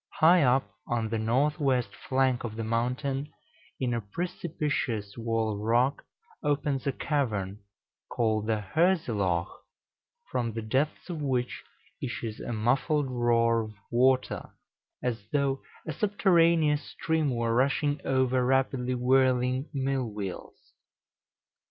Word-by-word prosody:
High 170 +3 +6
up 130 0 +3 0.2
on 115 -2 -1
the 115 0 -1
north 130 +7 +1
west 130 -4 +1
flank 130 -2 0
of 110 -3 -5
the 115 - -3
mountain, 125 +5 -1 0.5
in 125 -2 0
a 115 - -1
precipitous 140 - -3
wall 115 -2 -1
of 100 - -5
rock, 120 +6 +1 0.4
opens 140 -2 0
a - - +3
cavern, 105 -10 -1 0.5
called 110 -2 0
the 110 -2 0
Hörselloch, 110 - +1 0.7
from 115 -2 -1
the 115 0 -4
depths 135 +10 -1
of 160 -3 -4
which 125 -3 -1 0.4
issues 115 -3 -4
a - - -5
muffled 135 +5 +1
roar 115 -1 +3
of 110 -1 -7 0.2
water, 130 +2 +2 0.5
as 120 -4 -2
though 140 -2 +1 0.2
a 155 - -3
subterraneous 170 -6 +3
stream 160 -2 -1
were 115 -1 0
rushing 140 +3 +1
over 130 -1 +2
rapidly 130 -1 +1
whirling 130 +1 +2
millwheels. 125 - -4
125 Hz, 120 wpm, -28 LUFS, 115-140 Hz, 0.7 s, High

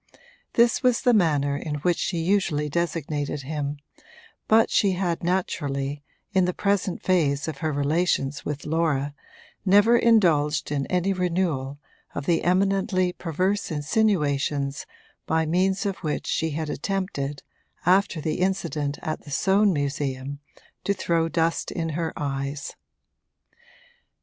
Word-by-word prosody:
This 235 0 +4
was 250 -2 +2
the 245 - +5
manner 145 -8 +2
in 150 +1 -4
which 170 +4 0
she 175 - -1
usually 165 -4 +1
designated 150 -3 -2
him, 145 0 -3 0.7
but 220 +1 +4
she 195 -2 +3
had 175 -2 -1
naturally, 145 -6 -1 0.3
in 190 -2 +4
the 180 - -1
present 200 -2 0
phase 155 -6 +1
of 155 -3 -5
her 155 -1 -1
relations 145 -1 0
with 150 -1 -4
Laura, 150 -3 0 0.5
never 205 +4 +5
indulged 160 -12 +3
in 140 -2 -1
any 185 +2 +1
renewal 170 -7 -1 0.4
of 140 - -4
the 170 +1 +2
eminently 185 0 +2
perverse 185 +5 -1
insinuations 145 -4 0 0.4
by 160 0 +2
means 190 +5 +1
of 195 -1 -1
which 155 -4 -3
she 160 - 0
had 155 +1 -3
attempted, 150 -5 -3 0.4
after 185 -1 +3
the 155 +1 -2
incident 170 -6 -1
at 155 - -3
the - - -13
Soane 195 +7 +3
Museum, 140 -2 -2 0.4
to 200 - +1
throw 165 -3 0
dust 165 0 0
in 165 -1 -3
her 160 +1 -2
eyes. 140 0 -3
165 Hz, 130 wpm, -25 LUFS, 145-185 Hz, 0.7 s, the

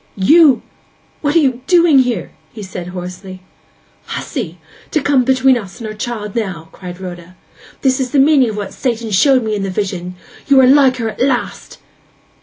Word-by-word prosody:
'D 190 - -4
n - - +1
you! 320 -6 +6 0.6
what 290 +1 -1
are 325 -3 +4
you 255 -2 -1
doing 340 -5 +5
here?' 250 -3 -1 0.2
he 215 - -9
said 185 -2 -7
hoarsely. 185 +1 -8 0.6
'Hussy—to 175 - -5
come 275 -2 +2
between 260 +1 +3
us 195 -5 -7
and 230 - -7
our 215 - -5
child 215 -2 -5
now!' 180 -8 -4
cried 180 -1 -10
Rhoda. 180 -1 -9 0.5
'This 265 0 +2
is 260 -1 -1
the 290 - -1
meaning 275 -3 +4
of 210 - -6
what 205 -2 -5
Satan 235 -4 -3
showed 255 +6 +3
me 220 -1 -2
in 205 - -3
the 195 - -3
vision! 185 -2 -4 0.3
You 275 -1 +5
are 260 - +6
like 265 -1 +5
her 230 -2 -2
at 220 - -8
last! 255 -2 -2
230 Hz, 190 wpm, -16 LUFS, 190-265 Hz, 0.6 s, you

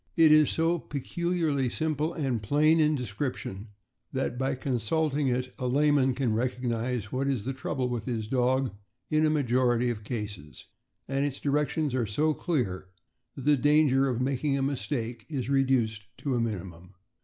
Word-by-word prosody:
It 160 -2 +7
is 155 -1 +6
so 165 +1 +1
peculiarly 155 -2 -1
simple 155 +2 -1
and 130 -8 -2
plain 150 +9 +3
in 155 0 +3
description 120 -4 -4 0.4
that - - -2
by 135 +2 -1
consulting 140 +4 0
it 125 0 -1
a 125 - -1
layman 140 -1 +3
can 125 -4 0
recognize 120 -2 -2
what 135 +2 -1
is 130 -7 -1
the 135 - -2
trouble 130 -1 -2
with 120 -4 -3
his 115 -4 -3
dog 130 +1 +1 0.4
in 155 0 +3
a - - +2
majority 125 -4 +2
of 110 -2 -6
cases, 105 - -6 0.4
and 135 +1 0
its 140 -1 -2
directions 150 0 0
are 125 -4 0
so 150 +10 +1
clear 110 - -2 0.5
that 135 - -8
the 150 0 +5
danger 140 -1 +4
of 125 -2 -1
making 135 +2 0
a 135 - 0
mistake 125 -4 -3
is 135 -5 -3
reduced 125 -6 +1
to 140 - -2
a 120 - +1
minimum. 90 -4 -5
130 Hz, 165 wpm, -28 LUFS, 120-145 Hz, 0.5 s, It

